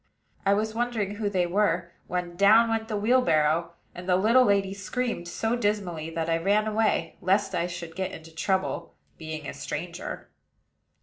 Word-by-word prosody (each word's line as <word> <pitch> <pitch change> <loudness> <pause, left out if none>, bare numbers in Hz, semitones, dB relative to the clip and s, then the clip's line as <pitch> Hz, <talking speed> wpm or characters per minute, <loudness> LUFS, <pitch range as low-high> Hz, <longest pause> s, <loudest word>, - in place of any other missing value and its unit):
I 200 - +5
was 215 +1 -1
wondering 225 -4 -1
who 210 -2 -1
they 185 -3 +1
were, 175 -2 +1 0.2
when 180 -1 -3
down 215 +5 +6
went 220 0 -1
the 215 -2 -2
wheelbarrow; 170 -8 +2 0.2
and 180 +1 -8
the 180 - +5
little 225 +7 +5
lady 200 -2 +2
screamed 200 -1 -3
so 225 +6 -1
dismally 200 -8 -1
that 165 0 -3
I 165 0 +2
ran 205 +5 +2
away, 215 -6 0
lest 195 +3 +2
I 170 - 0
should 170 -2 -7
get 190 0 -2
into 160 0 -11
trouble, 190 0 -1 0.2
being 155 -2 -6
a - - -5
stranger. - - -6
195 Hz, 170 wpm, -27 LUFS, 170-215 Hz, 0.2 s, down